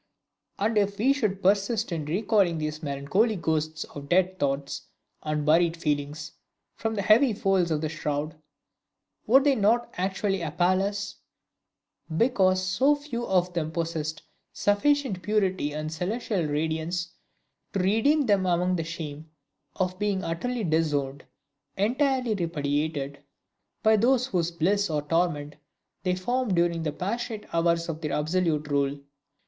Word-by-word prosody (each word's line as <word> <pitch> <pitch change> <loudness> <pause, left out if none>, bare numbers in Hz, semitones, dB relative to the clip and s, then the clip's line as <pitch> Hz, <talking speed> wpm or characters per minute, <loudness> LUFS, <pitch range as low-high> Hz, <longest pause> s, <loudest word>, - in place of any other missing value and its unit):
And 215 +2 +2
if 200 0 0
we 255 +6 +4
should 205 -8 -1
persist 200 +3 +2
in 160 -3 -2
recalling 190 +1 +2
these 155 0 -3
melancholy 150 +10 +1
ghosts 155 -3 -1
of 140 -1 -10
dead 185 +1 +2
thoughts 140 0 -2 0.3
and 150 -1 -2
buried 165 +2 +3
feelings 150 -1 -2 0.4
from 225 -1 -3
the 200 - -1
heavy 225 +5 +5
folds 195 -4 +1
of 155 -2 0
the 155 - -1
shroud, 150 0 -3 0.9
would 265 +5 +6
they 285 -1 +4
not 230 +1 +2
actually 195 0 -1
appal 175 +4 +1
us, 200 0 -3 1.0
because 190 -6 +3
so 260 +10 +3
few 285 -5 -5
of 180 -1 +1
them 160 -3 -1
possessed 160 -2 -3 0.3
sufficient 205 0 +1
purity 190 -5 0
and 155 +1 -4
celestial 190 0 -2
radiance 160 +3 -2 0.6
to - - -1
redeem 225 +11 +3
them 200 -4 +3
from 180 +1 +1
the 165 - -1
shame 160 -2 -7 0.5
of 185 0 -2
being 205 -2 0
utterly 230 +9 -2
disowned, 150 -5 0 0.5
entirely 255 +3 +1
repudiated, 145 -5 -2 0.6
by 220 0 +6
those 250 +3 +3
whose 175 -9 0
bliss 190 +4 +1
or 150 -2 -1
torment 150 -2 -1 0.4
they 180 -1 0
formed 240 +2 -1
during 170 -1 +1
the 155 -2 -1
passionate 215 +6 -4
hours 170 0 +2
of 165 -1 -5
their 150 -3 -2
absolute 155 -1 0
rule? 140 -1 0
180 Hz, 140 wpm, -27 LUFS, 155-210 Hz, 1.0 s, would